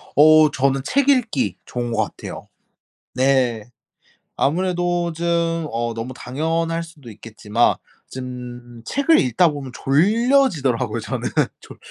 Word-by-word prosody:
어 155 Hz, 0 st, +6 dB
저는 135 Hz, 0 st, +1 dB
책 280 Hz, +1 st, +1 dB
읽기 215 Hz, -, +1 dB
좋은 120 Hz, -1 st, -4 dB
것 -, -, +1 dB
같아요. -, -, -8 dB, 0.7 s
네. 130 Hz, -4 st, +1 dB, 0.7 s
아무래도 175 Hz, +2 st, 0 dB
좀 170 Hz, +2 st, -4 dB, 0.5 s
어 115 Hz, 0 st, -2 dB
너무 115 Hz, +3 st, -5 dB
당연할 165 Hz, +6 st, -2 dB
수도 155 Hz, -8 st, -12 dB
있겠지만 110 Hz, +1 st, 0 dB, 0.4 s
좀 125 Hz, -2 st, -8 dB
책을 300 Hz, +4 st, +3 dB
읽다 130 Hz, +8 st, +3 dB
보면 140 Hz, -4 st, -6 dB
졸려지더라고요 190 Hz, -, +2 dB
저는. -, -, -3 dB, 0.3 s
졸 -, -, -13 dB
140 Hz, 235 characters per minute, -21 LUFS, 120-170 Hz, 0.7 s, 어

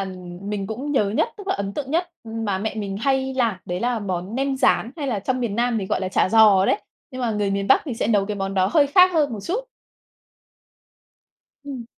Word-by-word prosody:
ừm, 180 Hz, -2 st, -7 dB
mình 200 Hz, -2 st, -3 dB
cũng 265 Hz, +8 st, -4 dB
nhớ 215 Hz, -, +3 dB
nhất, 220 Hz, -, +1 dB
tức 405 Hz, -1 st, -10 dB
là -, -, +1 dB
ấn 200 Hz, 0 st, -3 dB
tượng 275 Hz, -2 st, -4 dB
nhất 345 Hz, +3 st, 0 dB
mà 225 Hz, -4 st, -2 dB
mẹ 220 Hz, +2 st, -3 dB
mình 200 Hz, -2 st, -4 dB
hay 265 Hz, +2 st, 0 dB
làm, 235 Hz, -5 st, +1 dB
đấy 175 Hz, +1 st, -4 dB
là 245 Hz, -1 st, 0 dB
món 190 Hz, +1 st, -4 dB
nem 270 Hz, 0 st, 0 dB
rán, 245 Hz, -3 st, +2 dB
hay 290 Hz, -3 st, -3 dB
là 230 Hz, -6 st, -1 dB
trong 255 Hz, +5 st, -2 dB
miền 225 Hz, -3 st, -2 dB
Nam 240 Hz, -1 st, +1 dB
thì 190 Hz, -, -4 dB
gọi -, -, -1 dB
là 185 Hz, -, -2 dB
chả 185 Hz, -, +2 dB
giò 210 Hz, -3 st, +6 dB
đấy. -, -, +1 dB, 0.3 s
Nhưng 255 Hz, 0 st, -7 dB
mà 235 Hz, -2 st, 0 dB
người 210 Hz, -2 st, -1 dB
miền 195 Hz, 0 st, -1 dB
Bắc 270 Hz, -, +5 dB
thì 265 Hz, -, -4 dB
sẽ -, -, -1 dB
nấu 205 Hz, -3 st, +2 dB
cái 210 Hz, -, -3 dB
món 195 Hz, 0 st, -3 dB
đó 185 Hz, -1 st, +3 dB
hơi 295 Hz, -4 st, +5 dB
khác 365 Hz, +5 st, +5 dB
hơn 295 Hz, -5 st, +2 dB
một 220 Hz, -, -4 dB
chút. 460 Hz, +8 st, -2 dB, 2.0 s
Ừm. 265 Hz, -4 st, -6 dB
225 Hz, 240 wpm, -22 LUFS, 195-265 Hz, 2.0 s, giò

